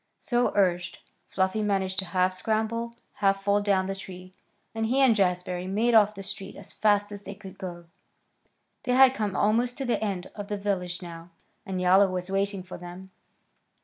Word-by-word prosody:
So 245 0 +1
urged, 180 -3 +1 0.3
Fluffy 190 +3 0
managed 195 -2 0
to 190 - -2
half 185 0 +1
scramble, 220 +4 -2 0.2
half 195 -1 +2
fall 200 +1 +2
down 195 -2 +2
the 195 - -2
tree, 185 -1 -10 0.4
and 225 0 -1
he 260 +4 +1
and 260 -4 +5
Jazbury 180 -2 0
made 220 +5 +1
off 215 -2 +7
down - - -17
the 195 - -7
street 195 0 -6
as 200 - -10
fast 205 -1 +2
as 205 -1 -7
they 200 0 -8
could 195 -2 -12
go. 175 -3 -7 1.0
They 250 - -1
had 260 0 +7
come 210 -5 -2
almost 235 +4 +1
to 270 - -3
the 240 -3 0
end 190 -4 -3
of 205 -1 -7
the 205 -1 -2
village 185 -3 -2
now, 170 0 -9 0.4
and 190 -1 -3
Yowler 190 +2 +5
was 180 0 -4
waiting 195 0 -1
for 180 - -9
them. 180 +2 -10
195 Hz, 190 wpm, -27 LUFS, 185-215 Hz, 1.0 s, off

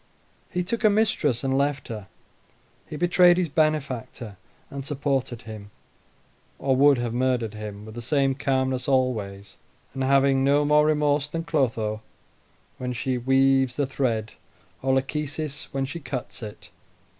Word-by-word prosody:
He 180 -2 -1
took 230 +6 -3
a 215 - +7
mistress, 200 - +1
and 135 0 0
left 140 -1 0
her; 105 -4 -6 0.8
he - - -7
betrayed 175 +2 +5
his 180 -3 0
benefactor, 135 -8 -1 0.4
and 140 -1 -5
supported 135 -4 -2
him, 110 -3 -9 0.9
or 135 -1 +1
would 140 +1 +5
have 120 -1 -2
murdered 125 -3 0
him, 105 -1 -7
with 110 - -10
the 120 - -6
same 135 +2 +1
calmness 130 -1 -1
always, 110 -7 -1 0.4
and 135 - -2
having 135 0 +3
no 145 +2 +3
more 150 +1 +4
remorse 150 -1 +2
than 165 +2 -4
Clotho 115 -9 -1 0.8
when 125 0 -3
she 125 +1 -2
weaves 135 0 +3
the 145 - +1
thread, 115 -5 -1 0.5
or 130 0 +2
Lachesis 150 +2 -3
when 135 -1 -1
she 145 +5 -6
cuts 130 -4 -6
it. 105 -2 -9
135 Hz, 145 wpm, -25 LUFS, 120-145 Hz, 0.9 s, a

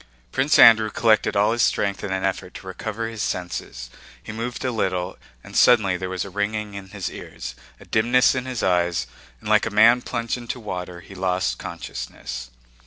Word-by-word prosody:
Prince 135 +3 +2
Andrew 110 -2 +8
collected 110 -2 +2
all 100 +2 +3
his 120 +1 0
strength 100 0 +1
in 100 - -3
an 95 0 -1
effort 95 -1 -2
to - - -9
recover 110 +4 -4
his 115 -2 -6
senses, 60 -9 -4 0.3
he - - -7
moved 120 +3 -4
a 130 - +1
little, 95 -5 -1 0.3
and - - -12
suddenly 110 -7 +5
there 90 +1 -4
was 95 0 -3
a 100 - -9
ringing 105 +1 -2
in 100 -1 -8
his 100 -1 -5
ears, - - -8 0.3
a - - -14
dimness 120 +3 +3
in 130 -1 -3
his 125 -3 -3
eyes, 90 -2 +1 0.3
and 110 - -10
like 110 +1 +3
a - - -1
man 115 +4 +5
plunged 115 0 -3
into 120 +1 -5
water 90 -5 -6
he 100 - -13
lost 90 -9 -1
consciousness. - - -7
105 Hz, 190 wpm, -23 LUFS, 90-115 Hz, 0.3 s, Andrew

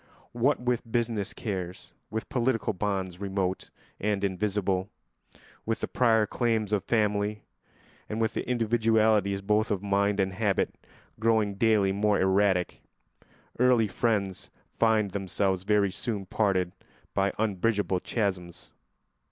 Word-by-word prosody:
What 125 +5 +1
with 125 -2 -2
business 115 -4 -1
cares, 95 -4 -5 0.2
with 110 0 -4
political 120 -3 0
bonds 95 -2 -2
remote 95 -1 -2 0.3
and 100 -1 -1
invisible, 95 0 -1 0.7
with 115 0 -2
the - - -1
prior 110 -3 +3
claims 110 -2 0
of 100 - +1
family, 105 -2 0 0.7
and 110 - -3
with 110 -1 0
individualities 110 -4 +2
both 105 +2 +2
of 100 -3 -1
mind 100 0 +1
and 95 -1 +1
habit 100 0 0 0.5
growing 110 -2 +2
daily 105 -1 +3
more 105 +1 +2
erratic, 95 -1 +2 0.8
early 125 -3 +4
friends 100 -3 -1 0.3
find 110 -3 +3
themselves 95 -1 -1
very 105 -2 +3
soon 105 0 -3
parted 95 -3 +1 0.4
by 100 0 +1
unbridgeable 105 -2 0
chasms. 90 -5 -3
105 Hz, 120 wpm, -28 LUFS, 95-110 Hz, 0.8 s, early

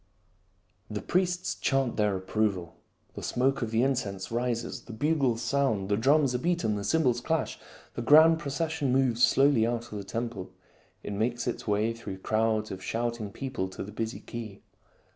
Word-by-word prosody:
The - - -3
priests 180 0 0
chant 135 -3 0
their 105 -2 +1
approval. 95 -3 -1 0.4
The - - -7
smoke 135 +2 0
of 115 - -1
the 115 +2 +2
incense 105 -9 -1
rises. 120 +1 -2
The 115 - -9
bugles 130 -2 +1
sound, 110 -9 0
the 100 - +3
drums 135 +4 +3
are 125 - 0
beaten, 170 -9 0
the 100 - -3
cymbals 125 0 +2
clash. 160 +1 -1 0.3
The - - -4
grand 160 +6 +7
proces 160 +1 -2
sion 145 -5 -1
moves 125 -3 +2
slowly 135 -3 +5
out 120 0 -3
of 105 - -4
the - - -6
temple; 115 -2 -4 0.5
it - - -4
makes 120 +4 -1
its 120 - -3
way 105 +2 +1
through 105 -4 -7
crowds 110 +2 0
of 95 - -6
shouting 115 0 -2
people 130 -6 -3
to 95 - -6
the 100 - -8
busy 110 +2 -4
quay. 110 -4 -7
120 Hz, 175 wpm, -28 LUFS, 110-135 Hz, 0.5 s, grand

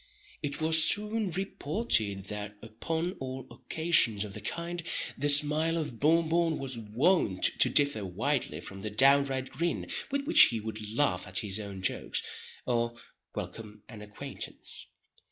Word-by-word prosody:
It 140 -1 -4
was 160 0 +5
soon 210 +2 +2
reported 155 - -1
that, 105 0 -6
upon 160 +10 -3
all 130 -1 -6
occasions 160 -11 +1
of 105 -2 -8
the - - -7
kind, 170 +1 -3 0.3
the 145 +2 0
smile 150 +3 +4
of 150 -8 -4
Bon 165 +2 +3
Bon 165 -1 +1
was 135 -2 -4
wont 115 - +1 0.2
to - - +6
differ 140 -8 +3
widely 100 - -2
from 95 +2 -8
the 105 - -4
downright 135 +3 +3
grin 170 +1 -2 0.2
with 280 0 -1
which 325 - +8
he 115 - -1
would 110 -1 -6
laugh 110 -7 0
at 95 - 0
his 100 +1 +1
own 100 -3 -7
jokes, - - -1 0.4
or 120 -1 0 0.4
welcome 105 -2 -7
an 110 -3 -11
acquaintance. 105 0 -7
135 Hz, 150 wpm, -29 LUFS, 105-160 Hz, 0.4 s, which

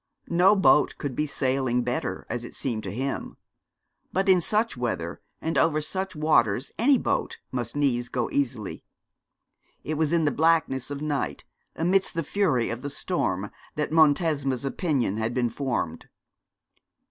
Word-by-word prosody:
No 180 +4 +5
boat 190 -6 +4
could 140 -4 -4
be 150 - 0
sailing 130 -3 0
better, 125 +1 -3
as 120 +1 -3
it 120 - -9
seemed 115 -5 -1
to - - -4
him; 135 +5 -4 0.7
but 190 +2 0
in 185 -2 +5
such 215 +6 +1
weather 110 -9 -3 0.2
and 165 +1 0
over 155 -2 +3
such 185 +4 -4
waters 140 -6 +2
any 265 +4 +5
boat - - -1
must 120 -1 -3
needs 125 -4 +1
go 125 -2 -1
easily. 125 -7 -2 1.0
It 155 0 -3
was 160 -1 +2
in 170 -2 +2
the 145 - +3
blackness 155 -5 +2
of 145 +1 -5
night, 145 -2 -2 0.3
amidst 185 +3 +1
the 165 - 0
fury 145 - +1
of 120 +1 -5
the 145 - -4
storm, 105 - -2 0.2
that 150 0 -2
Montesma's 145 -4 +3
opinion 135 - 0
had 110 +2 -2
been 120 -2 +1
formed. 120 - -3
140 Hz, 155 wpm, -26 LUFS, 120-165 Hz, 1.0 s, No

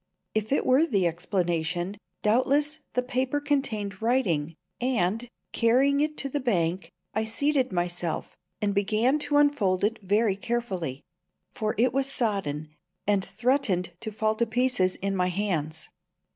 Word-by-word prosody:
If 215 +1 -1
it 280 - +2
were 270 +6 +4
the 200 - +2
explanation, 175 +1 -1 0.3
doubtless 280 +7 +2
the 250 - +1
paper 255 +2 0
contained 225 -9 -1
writing, 175 - +1 0.2
and, 235 -2 0 0.2
carrying 265 +5 +3
it 300 +1 0
to 275 - -1
the 290 - -1
bank, 185 -8 0 0.2
I 220 +1 0
seated 265 +3 +1
myself 175 -2 -2 0.3
and 205 -1 +1
began 215 +8 +2
to 295 0 +1
unfold 215 -11 +3
it 220 +3 +1
very 205 +1 +2
carefully; 195 - -3 0.5
for 215 -1 -2
it 245 +3 +3
was 275 0 0
sodden, 170 - -1 0.3
and 200 -2 +2
threatened 195 -4 0
to 220 - -5
fall 215 +1 +1
to 235 - +1
pieces 240 -6 +1
in 195 0 -2
my 180 -1 +2
hands. 165 -6 -2
215 Hz, 145 wpm, -27 LUFS, 185-255 Hz, 0.5 s, were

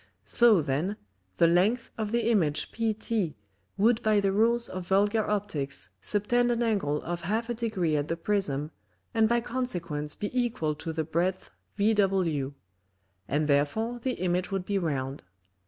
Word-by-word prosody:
So 225 -8 +5
then, 155 +9 -1 0.4
the - - +5
length 195 +8 +2
of 215 -3 -3
the 235 0 +1
Image 160 -9 +1
PT 220 -5 -1 0.4
would 225 +3 +3
by 215 -1 +3
the 195 -1 +1
Rules 230 +4 +3
of 185 -1 -6
Vulgar 205 +3 +3
Opticks 190 -10 -2
subtend 240 +4 +1
an 240 0 +1
Angle 195 -10 0
of 175 +1 -4
half 220 +7 -1
a - - 0
Degree 215 -9 -1
at 145 0 0
the 165 - -2
Prism, 165 -6 -1 0.4
and 220 -1 +3
by 235 0 +2
Consequence 175 -13 -3
be 205 - -4
equal 235 -11 0
to 160 +2 -6
the 160 0 -2
breadth 175 +4 -1 0.3
vw; 190 -10 +1 0.7
and 150 +2 0
therefore 185 +12 +1
the 255 +2 -1
Image 180 -2 -1
would 195 -2 -2
be 200 0 0
round. 140 -5 -3
195 Hz, 155 wpm, -28 LUFS, 160-225 Hz, 0.7 s, So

